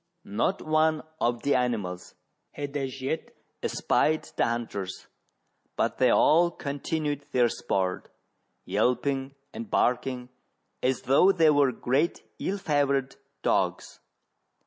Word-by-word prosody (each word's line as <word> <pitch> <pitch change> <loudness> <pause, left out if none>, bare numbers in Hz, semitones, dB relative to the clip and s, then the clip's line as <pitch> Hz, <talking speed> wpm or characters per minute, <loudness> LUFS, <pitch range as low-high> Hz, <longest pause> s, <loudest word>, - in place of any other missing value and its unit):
Not 115 - -1
one 155 0 +2 0.2
of 120 0 0
the 140 - +2
animals 110 -8 -2 0.4
had 145 -1 -6
as 135 -2 -3
yet 150 +5 -3 0.3
espied 155 +1 +1
the - - +2
hunters. 110 -5 -4 0.7
but - - -1
they - - +5
all 170 +2 +5
continued 145 -1 -3
their 120 -2 +4
sport, 95 -4 -2 0.6
yelping 135 +2 0 0.2
and 230 -1 -7
barking 125 -3 0 0.5
as 130 0 0
though 140 +9 +5
they 165 -5 +4
were 145 -3 +4
great 135 +7 0 0.2
ill 195 - -1
favoured 140 -6 0 0.3
dogs. - - 0
140 Hz, 115 wpm, -27 LUFS, 125-155 Hz, 0.7 s, they